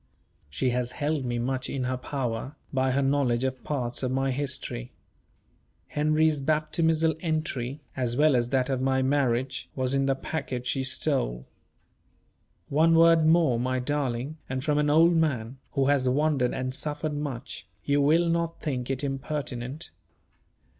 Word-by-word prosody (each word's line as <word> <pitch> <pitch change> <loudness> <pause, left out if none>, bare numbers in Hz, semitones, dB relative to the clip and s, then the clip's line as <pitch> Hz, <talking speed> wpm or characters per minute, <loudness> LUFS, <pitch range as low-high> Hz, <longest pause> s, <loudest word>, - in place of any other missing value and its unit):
She 125 - 0
has 125 0 -2
held 145 -2 -1
me 120 -1 -1
much 130 +2 -2
in 135 -2 -2
her 130 0 -1
power, 130 -1 -4 0.2
by 130 0 +2
her 140 +1 +2
knowledge 135 -3 +1
of 130 -1 -2
parts 125 -5 -2
of 130 - 0
my 135 +1 +1
history. 130 - -3 1.0
Henry's 155 0 +2
baptismal 155 +2 +2
entry, 155 -5 -2
as 125 -2 -1
well 150 -1 +5
as 120 -1 +1
that 130 -1 +1
of 130 -1 -1
my 130 0 +2
marriage, 130 -2 0
was 130 0 0
in 135 0 +2
the 135 - +2
packet 130 -3 -4
she 130 +1 0
stole. - - -1 1.2
One 160 +3 +4
word 165 -1 +6
more, 160 -7 +4
my 130 +1 0
darling 135 +1 -2
and 130 0 -3
from 150 -1 +1
an 150 0 +2
old 165 +3 +5
man, 135 -6 0
who 135 -2 +2
has 135 -2 +3
wandered 140 -2 +2
and 130 0 -2
suffered 150 +2 -3
much, 135 -8 -5 0.2
you 145 0 +2
will 160 +4 +4
not 170 0 -1
think 130 -5 -3
it 135 +1 -2
impertinent. 135 0 -4
135 Hz, 155 wpm, -27 LUFS, 125-150 Hz, 1.2 s, word